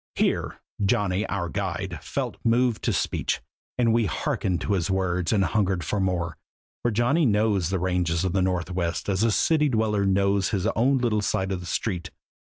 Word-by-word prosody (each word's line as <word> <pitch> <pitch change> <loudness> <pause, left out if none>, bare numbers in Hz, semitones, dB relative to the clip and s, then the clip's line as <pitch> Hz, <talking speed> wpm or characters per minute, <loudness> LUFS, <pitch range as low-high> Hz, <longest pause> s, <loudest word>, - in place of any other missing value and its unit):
Here, - - 0 0.2
Johnny, 100 -1 +1
our 95 -3 -2
guide, 80 - -3
felt - - -3
moved 120 0 +2
to - - +2
speech, - - -1 0.4
and 115 -2 +3
we 115 -2 +2
hearkened 90 +2 -1
to 100 - 0
his 85 -5 0
words 90 -2 0
and 100 -3 +3
hungered 95 -4 0
for 100 +6 -1
more, 90 -4 -1 0.4
for 120 - +1
Johnny 120 +9 +2
knows 105 -5 +2
the 95 - 0
ranges 90 -1 0
of 90 - -1
the 95 - +2
Northwest 90 -2 -1
as 95 0 +1
a 115 - +3
city 150 +7 +2
dweller 110 -4 +1
knows 100 0 +2
his 100 -3 -1
own 135 +4 +3
little 115 -4 +1
side 95 -2 -1
street. 90 -1 -2
100 Hz, 170 wpm, -25 LUFS, 90-110 Hz, 0.4 s, and